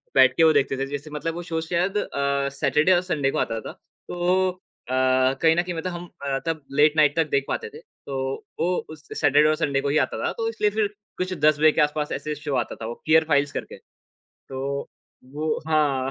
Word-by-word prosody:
बैठ 130 -1 +6
के 165 - +5
वो 160 -1 +6
देखते 135 -2 +1
थे। 135 - -1
जैसे 145 +2 -6
मतलब 160 +2 -3
वो 175 - -5
शो 165 -2 -3
शायद 180 +5 -1
अ, 140 -5 -1
सैटरडे 150 +5 +3
और 175 - +3
संडे 140 -4 +1
को - - -3
आता 115 0 -1
था। - - -7 0.4
तो 180 +1 +1
अ, 180 -7 -12 0.5
कहीं 160 0 +5
न 175 - +3
कहीं 180 -1 -4
मतलब 180 +3 -3
हम 175 0 -7 0.2
अ, 135 -1 0
तब 160 -2 -2 0.2
लेट 150 0 +6
नाइट 150 -1 +4
तक 160 -3 +1
देख 140 -1 +1
पाते 455 - -3
थे। 450 - -10
तो 140 - -9 0.4
वो 180 +2 +1
उस 155 -1 -12
सैटरडे 145 0 +4
और 155 - +2
संडे 135 -1 0
को 140 - -1
ही 150 - +2
आता - - -6
था। - - 0
तो 455 -1 -1
इसलिए 210 - +1
फिर 210 - +3 0.3
कुछ 185 0 -2
10 155 -2 +3
बजे 155 0 +6
के - - +1
आसपास 150 0 0
ऐसे 150 0 -4
शो 145 -2 -4
आता 120 - -1
था 110 - -8
वो, 115 - -4
फियर 160 +1 +5
फ़ाइल्स 145 -1 +2
करके। - - -6 0.5
तो 130 0 -8 0.7
वो 155 +1 -1
हाँ, 140 -4 +1
155 Hz, 225 wpm, -24 LUFS, 140-170 Hz, 0.7 s, बैठ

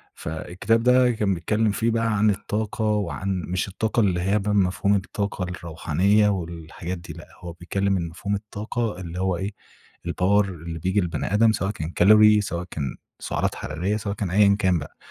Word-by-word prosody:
فالكتاب 90 +8 -1
ده 125 0 +5
كان 105 -4 0
بيتكلّم 105 +5 0
فيه 115 +3 0
بقى 115 -2 +1
عن 105 +1 +4
الطاقة 110 +3 -2
وعن 100 -2 -1
مش 90 +3 -1
الطاقة 110 +4 -1
اللي 90 -5 +2
هي 100 +3 +2
بقى 105 +1 -1
مفهوم 100 +1 +2
الطاقة 100 0 -3
الروحانية 90 +4 +1
والحاجات 85 -1 -4
دي. 85 -3 -9
لأ 85 - -12
هو 85 -2 -8
بيتكلّم 95 +3 -1
إن 85 -2 -2
مفهوم 100 +5 -3
الطاقة 105 +1 -4
اللي 90 0 -6
هو 95 -2 0
إيه؟ 95 +3 -3 0.6
الpower 85 - -5 0.3
اللي 85 -1 -7
بييجي 95 +5 +1
للبني 85 +2 -3
آدم 110 +1 +5
سواء 95 -2 -1
كان 80 -5 -5
كالوري 105 +4 +6
سواء 90 -4 -3
كان 70 -4 -3 0.2
سعرات - - -2
حرارية 90 +9 -2
سواء 100 -1 -4
كان 100 - -3
أيًا 100 +2 +5
كان 95 -4 +2
بقى. 75 - -10
100 Hz, 180 wpm, -24 LUFS, 85-105 Hz, 0.6 s, كالوري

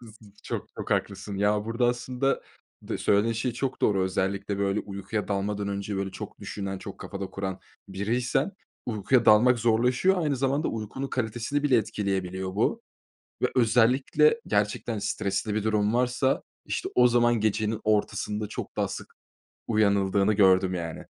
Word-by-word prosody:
Hı 120 - -13
hı. 110 - -13 0.3
Çok, - - -4
çok - - -6
haklısın 100 -2 -1
ya, 105 +1 +1
burada 115 +2 0
aslında, 125 +2 0 0.4
de - - -4
söylediğin 105 +3 +2
şey 120 +2 -2
çok 130 +2 -3
doğru. 100 -2 +3
Özellikle, 95 +2 -1
böyle, 100 +1 +1
uykuya 100 +2 -4
dalmadan 100 0 -1
önce, 100 0 -3
böyle, 95 0 -2
çok - - -8
düşünen, 95 -1 -5
çok - - -9
kafada 100 -1 -5
kuran 95 -1 -4 0.3
biriysen, 115 - 0 0.3
uykuya 120 +2 +2
dalmak 120 +4 +6
zorlaşıyor. 125 +11 +3
Aynı 145 -3 0
zamanda, 135 +4 0
uykunun 115 +5 -4
kalitesini 120 +4 -2
bile 140 -4 +4
etkileyebiliyor 95 -4 -2
bu 100 - 0 0.6
ve - - +5
özellikle 125 - +4
gerçekten 105 +2 0
stresli 100 0 -2
bir 110 -1 -1
durum 105 0 +1
varsa 125 +2 +1 0.2
işte - - -2
o 125 0 +6
zaman 120 0 +3
gecenin 110 +1 0
ortasında 105 0 0
çok - - -7
daha - - 0
sık - - -8 0.5
uyanıldığını 100 -2 +2
gördüm 95 -2 +4
yani. 85 -3 -5
105 Hz, 150 wpm, -27 LUFS, 100-120 Hz, 0.6 s, dalmak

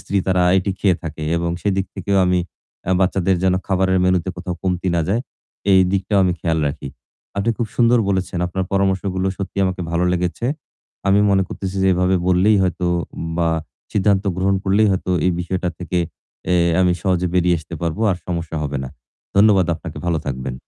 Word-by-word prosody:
স্ত্রী 100 - -1
তারা 90 -1 +2 0.2
এটি 95 +1 -1
খেয়ে 95 -4 +2
থাকে 80 -2 -6
এবং 85 0 -1
সেদিক 95 -1 0
থেকেও 100 0 -1
আমি 90 0 +2 0.5
আ - - +2
বাচ্চাদের 95 0 +2
যেন 95 -1 +3
খাবারের 95 -1 +2
মেনুতে 90 0 +1
কোথাও 90 0 -4
কমতি 90 -1 -1
না - - +2
যায়। 105 +5 +1 0.5
এই 95 - +7
দিকটাও 100 +1 +1
আমি 90 - +2
খেয়াল 80 -2 0
রাখি। 70 -1 -4 0.5
আপনি 100 +4 +1
খুব 120 - 0
সুন্দর 120 0 +4
বলেছেন। 95 -2 -1
আপনার 95 +2 -2
পরামর্শগুলো 95 -1 0
সত্যিই 100 0 -2
আমাকে 95 -1 -2
ভালো 85 +1 +1
লেগেছে। 90 +6 -1 0.6
আমি 100 +1 +5
মনে 95 -1 +3
করতেছি 95 0 -5
যে 95 - +4
এভাবে 90 +1 +2
বললেই 95 +4 +4
হয়তো 90 -1 -1 0.5
বা 85 -1 +2 0.4
সিদ্ধান্ত 100 0 +2
গ্রহণ 95 +1 +1
করলেই 100 +2 +3
হয়তো 95 0 -2 0.2
এই - - +4
বিষয়টা 90 0 -2
থেকে 90 0 -2 0.5
অ্যা 90 - +3 0.3
আমি 90 -1 +4
সহজে 90 -2 +1
বেরিয়ে 90 -1 +3
আসতে 80 +2 -9
পারবো। 85 +4 -2
আর 90 - 0
সমস্যা 85 -2 -3
হবে 70 -1 -2
না। 65 - -6 0.5
ধন্যবাদ 100 -3 +5
আপনাকে। 80 - -8
ভালো 85 -2 +1
থাকবেন। 65 -2 -3
95 Hz, 180 wpm, -20 LUFS, 90-95 Hz, 0.6 s, এই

